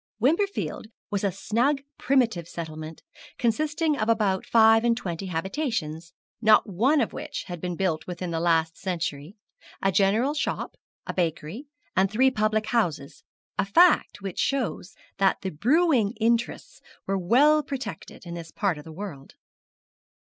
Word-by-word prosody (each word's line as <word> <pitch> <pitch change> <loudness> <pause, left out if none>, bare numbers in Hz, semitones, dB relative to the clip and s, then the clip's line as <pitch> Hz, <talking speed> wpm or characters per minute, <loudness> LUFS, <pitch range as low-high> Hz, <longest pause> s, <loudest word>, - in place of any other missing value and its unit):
Wimperfield 335 - 0 0.2
was 200 -1 -1
a 200 - +1
snug 265 - 0 0.2
primitive 225 - +1
settlement, 155 -1 -7 0.3
consisting 300 +6 +1
of 220 -4 -1
about 210 -4 +1
five 225 0 +6
and 235 -1 +2
twenty 185 -3 -4
habitations, 170 - -3 0.3
not 215 -1 +5
one 250 - +2
of 225 - -1
which - - -5
had 175 -3 -8
been 180 -1 -3
built 170 -4 -1
within 180 -1 -5
the 165 - -1
last 165 -1 +2
century, 170 -2 -4 0.4
a 195 - +1
general 210 +9 +2
shop, 300 - -3 0.3
a - - -4
bakery, 170 - -3 0.3
and 190 +1 +3
three 260 +6 +3
public 215 -2 0
houses, 165 -9 -1 0.4
a - - +4
fact 310 - +4
which 195 -3 -5
shows 250 -8 -1 0.2
that 195 -1 +2
the 190 - -3
brewing 245 - +2
interests 235 +1 -1 0.2
were 195 - -1
well 265 +12 +4
protected 255 - -7
in 170 - -7
this 170 -1 -7
part 190 -7 -1
of - - -10
the 160 - -11
world. 160 -6 -8
200 Hz, 150 wpm, -26 LUFS, 170-245 Hz, 0.4 s, five